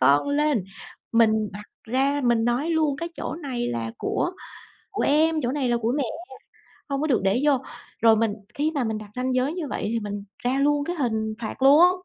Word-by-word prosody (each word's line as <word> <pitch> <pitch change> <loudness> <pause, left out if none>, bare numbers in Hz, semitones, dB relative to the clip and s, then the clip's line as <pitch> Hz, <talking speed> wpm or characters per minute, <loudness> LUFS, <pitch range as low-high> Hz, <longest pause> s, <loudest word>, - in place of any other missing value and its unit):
con 140 - +4
lên. 285 -7 +1 0.5
Mình 220 -2 +3
đặt 210 +1 -9 0.2
ra, 270 +5 +1
mình 235 -2 +3
nói 245 +7 0
luôn: 310 -4 +1
"Cái 335 +3 -4
chỗ - - -4
này 265 -7 -3
là 115 -1 -3
của 355 - -1 0.6
của 405 - -2
em, 315 +3 +3
chỗ 240 - 0
này 270 -3 -1
là 240 - +2
của 230 0 0
mẹ, 285 - +1 0.9
hông 275 -1 -1
có 310 - 0
được 270 -6 +2
để 195 +5 +2
vô." 290 -3 +4 0.4
Rồi 225 -1 +6
mình 220 -1 +1 0.2
khi 300 +2 0
mà 285 -5 -1
mình 220 -1 -2
đặt 210 -1 -10
ranh 255 0 -1
giới 260 +5 +1
như 340 -5 -4
vậy, - - -3
thì 230 - 0
mình 205 -1 -5
ra 250 +2 0
luôn 290 0 +2
cái 350 +3 -3
hình 220 -6 -1
phạt 230 +3 -5
luôn. 280 +4 +7
Á, 360 - +8
255 Hz, 220 wpm, -25 LUFS, 220-290 Hz, 0.9 s, Á